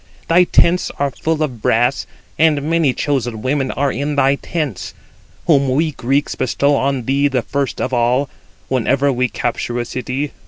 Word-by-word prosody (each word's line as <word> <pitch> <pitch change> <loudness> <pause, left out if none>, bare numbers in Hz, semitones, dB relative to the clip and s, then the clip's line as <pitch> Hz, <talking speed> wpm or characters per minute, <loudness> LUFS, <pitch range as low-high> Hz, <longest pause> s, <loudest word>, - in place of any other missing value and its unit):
Thy 175 +2 +5
tents 175 +1 +3
are 140 -1 0
full 160 +4 -1
of 125 -7 -4
brass, 120 +5 +1 0.3
and 155 -3 +3
many 160 -2 +2
chosen 125 -6 -2
women 135 0 0
are 140 0 0
in 145 +1 -2
thy 135 -1 +3
tents, 140 - -4 0.5
whom 140 -5 +3
we 155 +5 +1
Greeks 135 +2 -1
bestow 140 +3 +1
on 135 -3 -1
thee 140 +3 +2
the 130 -4 -1
first 140 +2 -2
of - - -2
all, 125 +3 +2 0.4
whenever 135 +2 +1
we 125 0 0
capture 120 +1 -3
a 120 - -2
city. 130 +4 -3
140 Hz, 165 wpm, -18 LUFS, 125-145 Hz, 0.5 s, Thy